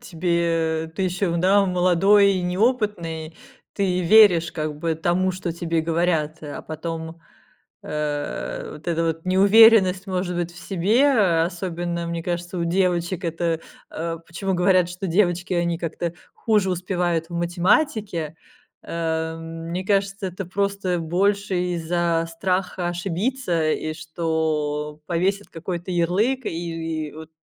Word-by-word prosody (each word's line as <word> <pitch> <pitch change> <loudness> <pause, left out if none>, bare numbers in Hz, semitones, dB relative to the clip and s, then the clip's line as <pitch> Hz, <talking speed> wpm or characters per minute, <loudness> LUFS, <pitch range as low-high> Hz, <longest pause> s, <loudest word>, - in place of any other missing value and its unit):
тебе, 165 -4 -1
ты 190 - -1
ещё, 180 -1 0
да, 195 +3 +4
молодой 185 +3 +4
и 185 - -1
неопытный, 180 -6 -1 0.4
ты 185 -3 0
веришь 180 -2 +6
как 155 -2 -4
бы 165 0 -1
тому, 175 +3 +1
что 180 -2 -4
тебе 165 -1 -1
говорят. 160 -2 0
А 145 -1 -7
потом, 160 +1 -6 0.6
э, 150 -1 -3
вот 155 +3 -8
эта 165 0 +1
вот 165 +1 -2
неуверенность 195 0 +6
может 180 -1 -2
быть 175 0 -2
в 175 - -13
себе, 195 -1 +3
особенно, 170 -1 -3
мне 170 0 -3
кажется, 175 +1 -3
у 170 - 0
девочек 180 0 0
это, 165 0 -1 0.3
э, 165 0 -4
почему 190 +2 -3
говорят, 180 0 +3
что 180 +2 -5
девочки 175 0 +1
они 170 -1 0
как-то 170 0 -3 0.2
хуже 210 -4 +1
успевают 175 -2 -1
в - - -6
математике, 175 - 0 0.5
э, 160 -1 -2
мне 165 +2 -5
кажется, 195 0 0
это 185 +2 -6
просто 200 -1 -1
больше 195 +4 0 0.2
из-за 170 0 0
страха 180 +1 -1
ошибиться, 175 -1 -1
и 155 - -2
что 155 -2 -2
повесят 190 +4 0
какой-то 175 +2 -5
ярлык. 205 +10 +1
И 165 -2 -3
и - - -17
вот 160 0 -10
175 Hz, 130 wpm, -23 LUFS, 165-190 Hz, 0.6 s, веришь